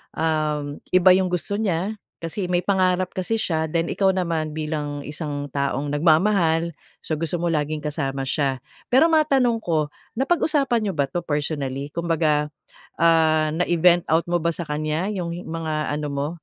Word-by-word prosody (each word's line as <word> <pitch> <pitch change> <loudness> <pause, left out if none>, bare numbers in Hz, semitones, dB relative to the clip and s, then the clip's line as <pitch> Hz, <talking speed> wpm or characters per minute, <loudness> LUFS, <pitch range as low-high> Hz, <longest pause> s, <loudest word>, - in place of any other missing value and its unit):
um, 150 -2 -1
iba 185 0 +6
yung 190 0 +2
gusto 180 +3 -1
niya, 195 0 -1 0.3
kasi 180 +3 -3
may 175 - +3
pangarap 185 -1 +2
kasi 190 +4 -1
siya. 160 -6 0
Then 165 0 0
ikaw 195 -1 +3
naman 165 -4 -1
bilang 150 -2 -3
isang 145 -1 -4
taong 140 0 -1
nagmamahal, 165 +1 +3 0.3
so 155 - -1
gusto 165 +1 -2
mo 175 - 0
laging 150 0 -1
kasama 140 -3 -2
siya. 135 -2 0 0.3
Pero 265 +6 +6
matanong 275 -7 +3
ko, 155 -3 0 0.3
napag-usapan 275 -5 +1
niyo 195 - -1
ba 140 -1 +2
ito 175 - -2
personally? 145 -3 -2
Kumbaga 155 -3 +1 0.5
ah, 160 -1 +4
na-i-vent 175 0 +3
out 165 +2 +2
mo 175 0 +1
ba 170 - +2
sa 175 - -5
kanya 155 +4 -1
yung 175 -4 -3
i - - -6
mga 160 -2 -3
ano 150 0 -2
mo? 140 +1 -2
165 Hz, 160 wpm, -23 LUFS, 150-180 Hz, 0.5 s, iba